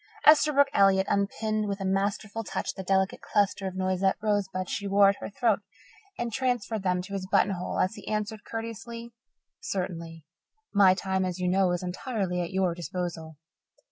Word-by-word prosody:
Esterbrook 300 -2 +6
Elliott 195 -1 +4
unpinned 215 +2 0
with 200 0 -3
a 195 - -3
masterful 200 +3 -1
touch - - -3
the - - -6
delicate 190 0 +1
cluster 205 -1 +1
of 190 - -6
Noisette 185 0 +1
rosebuds 200 -3 -1
she 200 - -2
wore 200 0 +6
at 200 - 0
her - - -6
throat 215 0 +1 0.6
and 235 -2 -3
transferred 245 -4 -1
them 180 -1 0
to 200 +2 -9
his 190 -1 -3
buttonhole 190 -1 +1
as 185 - +1
he - - -11
answered 215 0 -3
courteously: 230 +1 -6 0.5
"Certainly. 170 - -4 0.5
My 195 -2 +6
time, 190 0 -1
as 185 -1 -2
you 180 -1 -1
know, 185 +1 +3
is 175 0 -2
entirely 180 -1 -2
at 170 - -3
your 190 -2 +1
disposal." 170 -2 -5
195 Hz, 170 wpm, -28 LUFS, 185-215 Hz, 0.6 s, Esterbrook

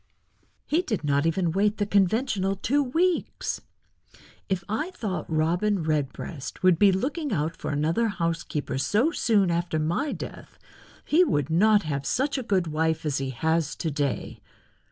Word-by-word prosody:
"He 320 +4 +2
did 220 - -3
not 145 +1 +2
even 165 0 +1
wait 205 +4 +1
the 205 - 0
conventional 200 0 +1
two 275 +9 +1
weeks. 330 +7 0 0.9
If 190 -2 -1
I 225 - -2
thought 210 - -4
Robin 175 +5 +1
Redbreast 150 -1 -3
would 185 -3 +5
be 205 -1 +6
looking 285 - -2
out 160 -2 -1
for - - -5
another 160 +10 +1
housekeeper 165 -7 -2
so 225 - +2
soon 210 - +2
after 170 -1 -1
my 170 - 0
death - - -8 0.5
he 335 +4 +4
would 145 - 0
not 205 +5 +4
have 140 -2 -3
such 280 +2 0
a 250 - -8
good 190 -3 +2
wife 160 0 -1
as 145 -2 0
he 135 -1 -3
has 160 +4 0
to 160 - -3
day. 140 -2 -3
180 Hz, 155 wpm, -26 LUFS, 155-220 Hz, 0.9 s, be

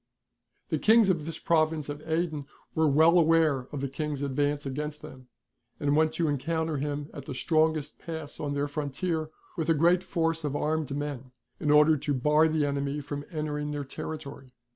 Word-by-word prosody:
The - - 0
Kings 220 -3 +5
of 160 -4 -2
this 165 -1 -4
province 155 -2 +1
of 145 0 -6
Aden 160 -3 -1 0.3
were 160 0 +3
well 160 +5 +5
aware 160 -5 +3
of 145 - -4
the 140 - -1
King's 145 +1 -3
advance 145 +1 0
against 150 +3 -4
them, 130 -4 -11 0.5
and 145 0 +1
went 155 0 +3
to 170 - 0
encounter 160 +2 -1
him 145 +1 -3
at 145 -4 -8
the 135 - -6
strongest 155 0 +1
pass 160 -3 -7
on 145 -1 -2
their 145 +1 0
frontier, 155 +3 -2 0.3
with 160 -1 -1
a 165 - +5
great 170 +4 +4
force 165 -3 -1
of 145 -1 -2
armed 155 0 0
men, 135 -3 -5 0.3
in 150 - -1
order 150 +1 +6
to 145 +1 -1
bar 150 +4 +4
the 155 -2 +1
enemy 140 0 -1
from 145 0 -5
entering 150 -2 -3
their 145 -1 -3
territory. 140 -3 -7
150 Hz, 185 wpm, -28 LUFS, 145-160 Hz, 0.5 s, order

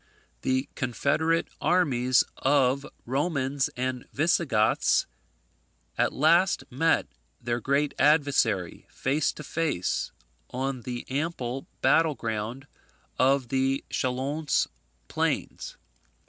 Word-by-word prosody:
The 130 +1 0
confederate 150 +5 0
armies 130 -8 +3
of 135 0 +2 0.2
Romans 140 0 0
and 125 0 -3
Visigoths 140 -8 +2 0.9
at - - +1
last 170 +6 +3
met 160 +6 +2 0.3
their 120 0 -2
great 140 +4 0
adversary, 140 - +2
face 140 +3 0
to 150 - -9
face, 150 - -1 0.4
on 130 0 -3
the 120 0 -5
ample 135 -3 -3 0.2
battle 160 -2 +4
ground 115 +4 -4 0.5
of 130 -1 +3
the 135 0 0
Chalons 135 +4 0 0.4
plains. - - -2
135 Hz, 90 wpm, -27 LUFS, 125-150 Hz, 0.9 s, battle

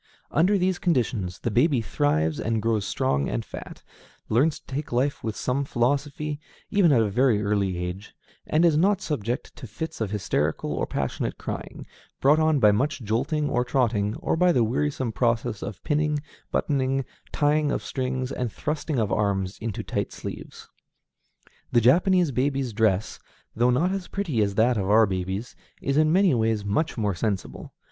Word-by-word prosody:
Under 185 +7 +3
these 185 -1 0
conditions 115 - 0
the 115 - -1
baby 130 +4 +3
thrives 80 - 0
and 115 0 0
grows 110 -2 0
strong 70 0 0
and - - -2
fat; - - -9 0.5
learns 140 +8 +2
to - - -38
take 140 +3 -5
life 130 +4 0
with 110 -2 -3
some 130 +2 -1
philosophy, 145 +4 -1 0.3
even 195 -6 +4
at 120 -5 +4
a 105 - 0
very 115 -2 +3
early 100 -3 0
age; 90 +3 -6 0.3
and 160 +3 +3
is 165 -3 +4
not 190 +5 +3
subject 125 -5 -3
to 125 - -8
fits 160 +7 -6
of 110 - 0
hysterical 85 -7 -1
or - - -2
passionate - - -3
crying, - - -6 0.3
brought 145 +3 +4
on 155 -1 +3
by 105 -4 +6
much 140 +5 -1
jolting 135 +8 0
or 125 -3 +1
trotting, 115 -5 0
or - - -1
by 180 +2 +4
the 125 -7 +3
wearisome 130 +1 -1
process 115 -3 0
of 100 -5 -7
pinning, 150 0 +1 0.3
buttoning, 135 -2 0 0.3
tying 150 0 +2
of - - -2
strings, 130 0 -3
and 125 -4 -3
thrusting 150 +2 -3
of 110 -4 0
arms 95 -2 0
into 110 -3 -4
tight - - -3
sleeves. - - -8 1.0
The 120 - +5
Japanese 175 - +4
baby's 135 -1 -1
dress, 105 -2 +1 0.4
though 120 +2 +3
not 155 +9 +2
as 195 -2 -3
pretty 165 - -1
as 100 -1 0
that 115 +3 +3
of 95 -1 -1
our 110 +2 +6
babies, 95 +3 -4 0.2
is 140 - -1
in 155 +1 +4
many 185 -1 +4
ways 110 -3 0
much 110 +11 0
more 105 -3 0
sensible. 100 +1 -3
125 Hz, 170 wpm, -25 LUFS, 105-150 Hz, 1.0 s, by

